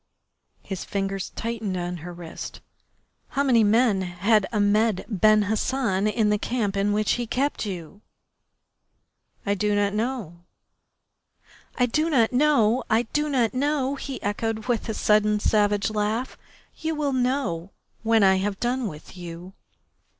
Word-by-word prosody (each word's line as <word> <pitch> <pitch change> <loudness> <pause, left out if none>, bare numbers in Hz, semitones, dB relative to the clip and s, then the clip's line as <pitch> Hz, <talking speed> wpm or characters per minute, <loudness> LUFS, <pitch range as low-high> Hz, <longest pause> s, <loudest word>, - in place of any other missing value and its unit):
His 190 -3 -5
fingers 195 -1 -3
tightened 225 -5 -3
on 175 0 -3
her 175 +2 -8
wrist. 170 -2 -8 0.7
"How 280 - 0
many 245 -5 +4
men 215 -1 +3
had 195 +4 +1
Ahmed 210 -1 +2
Ben 215 0 +4
Hassan 215 -1 0
in 215 0 +2
the 210 - +1
camp 215 -5 -1
in 200 +1 +1
which 210 0 +1
he 240 -1 -1
kept 260 -1 -1
you?" 185 +1 -7 1.4
"I 200 - +2
do 210 +1 0
not 205 0 +1
know." 215 -6 -3 1.4
"I 250 - +3
do 305 +7 0
not 245 -6 +3
know! 255 -4 +3
I 225 +2 +3
do 300 0 +1
not 250 -5 +1
know!" 275 0 0
he 275 -1 -5
echoed 220 +2 -2
with 240 -2 -1
a 220 - -2
sudden 210 0 +3
savage 205 -1 +2
laugh. 215 +4 -1 0.4
"You 320 0 -2
will 290 -2 -1
know 245 -10 -1 0.3
when 225 -1 +3
I 190 -1 +5
have 195 +1 -2
done 245 0 -1
with 155 0 -10
you." 175 +1 -9
215 Hz, 145 wpm, -25 LUFS, 195-245 Hz, 1.4 s, I